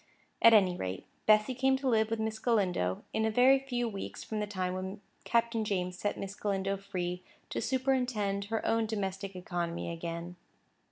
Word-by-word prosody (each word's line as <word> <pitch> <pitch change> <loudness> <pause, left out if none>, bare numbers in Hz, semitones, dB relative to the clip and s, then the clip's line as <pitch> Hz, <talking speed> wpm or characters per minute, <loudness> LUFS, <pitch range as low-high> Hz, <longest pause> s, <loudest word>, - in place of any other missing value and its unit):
At 230 - +9
any 190 -4 +5
rate, 95 - -4 0.2
Bessy 215 +3 +5
came 265 +1 +2
to 270 0 -3
live 220 -3 +3
with 225 0 -1
Miss 220 0 -2
Galindo, 185 - +1
in 220 - +1
a 220 - +2
very 255 +4 +5
few 245 -3 -2
weeks 200 -3 -6
from 215 - -4
the 210 - -1
time 185 -3 -2
when 190 +2 -4 0.3
Captain 230 -1 +2
James 180 -3 -1
set 205 +3 -2
Miss 195 0 -5
Galindo 195 -1 -1
free 180 -2 -4 0.3
to - - -2
superintend 250 -7 0
her 220 +1 -2
own 225 0 +2
domestic 195 -2 -3
economy 175 -2 -3
again. 170 +1 -5
205 Hz, 175 wpm, -31 LUFS, 185-225 Hz, 0.3 s, At